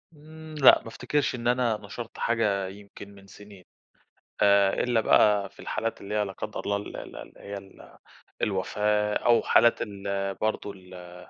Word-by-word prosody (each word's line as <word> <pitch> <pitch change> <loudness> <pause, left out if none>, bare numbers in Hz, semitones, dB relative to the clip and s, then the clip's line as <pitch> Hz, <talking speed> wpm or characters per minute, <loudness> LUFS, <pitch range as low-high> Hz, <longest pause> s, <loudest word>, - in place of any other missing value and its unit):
امم، 155 +1 -12
لأ 145 -3 +7
ما - - -13
أفتكرش 130 +5 -1
إن 120 -1 -4
أنا 120 -3 +2
نشرت 110 +3 -9
حاجة 105 -5 0
يمكن 100 +1 -12
من 100 0 -16
سنين. 100 -1 -14 0.8
آآ، 100 -1 +4
إلَّا 120 -2 +1
بقى 105 -2 +4
في - - -26
الحالات 115 +1 -4
اللي 100 +2 -5
هي 105 -1 +1
لا 95 - -6
قدّر 105 +2 -6
الله 100 0 -1
ال 100 - -8
ال - - -9
اللي - - -12
هي 100 0 -7
ال 95 -1 -15 0.4
الوفاة 105 +2 0
أو 120 -1 +3
حالات 120 - +4
ال 100 -2 -3
برضه 110 0 -2
ال 90 -2 -13
105 Hz, 170 wpm, -26 LUFS, 100-115 Hz, 0.8 s, لأ